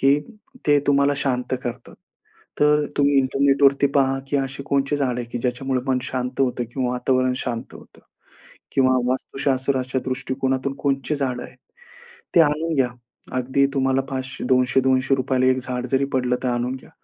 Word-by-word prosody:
की 140 +2 +4 0.5
ते 145 -1 +5
तुम्हाला 140 0 +3
शांत 130 -2 -1
करतात. 120 0 -6 0.7
तर 150 0 +4
तुम्ही 145 0 +3
इंटरनेटवरती 140 +1 +3
पहा 135 -1 +3
की 145 - +1
अशी 135 0 -3
कोणती 140 +1 0
झाडं 130 -4 -1
आहेत 120 - -7
की - - -2
ज्याच्यामुळे 125 +2 -1
मन 130 -1 +2
शांत 130 0 -3
होतं 125 -2 +1
किंवा 130 -2 -1
वातावरण 130 +1 +1
शांत 120 -3 -4
होतं - - -15 0.8
किंवा 130 -1 +4 0.2
वास्तुशास्त्राच्या 130 0 -1
दृष्टिकोनातून 130 +1 -2
कोणती 140 +1 -1
झाडं 130 -3 -2
आहेत? - - -13 0.8
ते 170 - +8
आणून 160 +2 +1
घ्या. 130 -3 +3 0.5
अगदी 130 +2 +2
तुम्हाला 135 -1 +1
500 130 0 -4
₹200-200ला 130 0 +2
एक 130 0 +3
झाड 125 -1 -4
जरी 135 +1 +2
पडलं, 125 -1 +1
तर - - 0
आणून 120 +1 -1
घ्या. 130 - -13
130 Hz, 150 wpm, -22 LUFS, 130-140 Hz, 0.8 s, ते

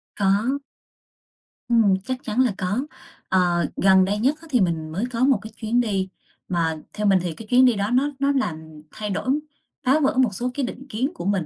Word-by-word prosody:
Có. 210 +8 +1 1.1
Ừm, 225 -5 +4
chắc 255 +1 -2
chắn 225 +3 0
là 245 -5 +2
có. 190 +6 -1 0.5
Ờ, 175 -3 +2
gần 190 0 +5
đây 205 +2 -1
nhất 260 +7 +2
á 330 - -13
thì 250 -6 +3
mình 160 -3 -1
mới 190 +7 -2
có 230 - -4
một 270 -1 +4
cái 220 - -9
chuyến 230 +2 0
đi, 195 -5 -1 0.4
mà 165 -3 0 0.2
theo 210 -1 -1
mình 195 -1 +5
thì 175 -2 -3
cái 220 +3 -11
chuyến 255 +2 +5
đi 245 - +5
đó 200 +1 -1
nó 270 +4 +2
nó 280 +1 +2
làm 160 - -3
thay 210 -1 -5
đổi, 200 +6 -2 0.5
phá 270 +4 +3
vỡ 270 - +1
một 250 -6 +3
số 245 +5 -2
cái 275 0 -1
định 265 +2 -7
kiến 255 +8 -1
của 335 - -7
mình, 195 -4 0
210 Hz, 215 wpm, -23 LUFS, 185-255 Hz, 1.1 s, gần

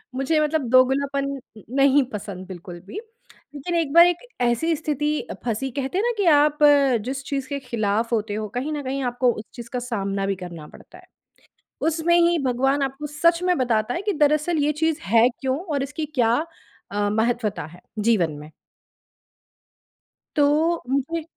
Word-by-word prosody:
मुझे 270 +4 +1
मतलब 300 -4 0
दोगलापन 270 +2 +3
न 240 -6 -11
नहीं 275 0 +5
पसंद 195 -3 -6
बिल्कुल 180 -1 -9
भी। 415 - -6 0.6
लेकिन 320 +5 -3
एक 320 -4 0
बार 340 +1 +9
एक 355 -1 +1 0.2
ऐसी 245 +8 +1
स्थिति 300 0 -2 0.2
फँसी, 245 +3 -2
कहते 275 +6 -3
हैं 405 - +1
ना 485 - +2
कि 405 - +1
आप 300 -2 +4
अ, 280 -4 +5
जिस 265 +5 -5
चीज़ 275 -2 -3
के 280 -1 -3
ख़िलाफ़ 230 -2 -1
होते 210 -1 -2
हो 215 0 -3
कहीं 280 +5 -2
न 290 - -4
कहीं 270 +1 -3
आपको 245 0 +2
उस 215 - -8
चीज़ 235 -1 -9
का 250 - -1
सामना 200 -5 -2
भी 195 - 0
करना 170 -4 -8
पड़ता - - -15
है। - - -17 0.8
उसमें 330 +2 +2
ही 345 0 +4
भगवान 270 +3 +1
आपको 270 +2 -3
सच 335 +4 +2
में 360 -1 +2
बताता 235 -2 0
है 350 - -3
कि 410 0 0
दरअसल 305 +2 +2
ये 300 - +2
चीज़ 320 -2 +1
है 230 +3 +4
क्यों 265 0 -1
और 290 -7 -2
इसकी 295 +3 -5
क्या 235 -4 +3 0.6
अ, 205 0 0
महत्त्वता 220 -4 -1
है, 175 - -15 0.2
जीवन 205 -8 +2
में? 150 +1 -11 1.9
तो 310 +3 +2
मुझे 290 +5 -1
270 Hz, 175 wpm, -23 LUFS, 230-300 Hz, 1.9 s, बार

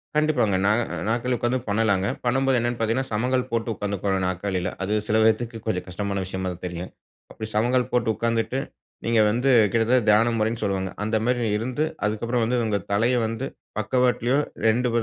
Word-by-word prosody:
கண்டிப்பாங்க. 145 -10 +2
நா, 100 - +4 0.4
நாற்காலில 120 +2 0
உட்காந்து 120 +2 0
பண்ணலாங்க. 100 -2 +2 0.2
பண்ணும்போது 135 +1 +2
என்னன்னு 120 0 -2
பாத்தீங்கன்னா, 115 +4 0
சமங்கால் 125 +4 0
போட்டு 115 0 -1
உட்காந்து 100 0 -3
கொள்ளனும் 95 -2 +1
நாற்காலில. 95 0 -2
அது 100 +3 -1
சில 110 - +2
பேத்துக்கு 115 +1 +1
கொஞ்சம் 95 -5 -1
கஷ்டமான 100 +1 -3
விஷயமா 95 0 -3
தான் 90 - -14
தெரியும். 90 +1 -6 0.6
சமங்கால் 125 +3 +2
போட்டு 120 -2 +1
உட்காந்துட்டு, 115 +2 0 0.5
நீங்க 115 -1 +2
வந்து 125 +5 +1 0.2
கிட்டத்தட்ட 115 +3 +3
தியானம் 115 +2 +4
முறைன்னு 110 +1 -1
சொல்வாங்க. 95 -2 -1
அந்த 110 +1 -1
மாரி 120 -1 +1
இருந்து 125 +6 -2 0.2
அதுக்கப்றம் 115 +3 0
வந்து, 125 +2 0
உங்க 105 -2 +1
தலைய 115 +5 +2
வந்து 115 +4 -3 0.3
பக்கவாட்லயும் 125 +4 +2 0.2
2 120 +3 +2
115 Hz, 160 wpm, -24 LUFS, 105-125 Hz, 0.6 s, நா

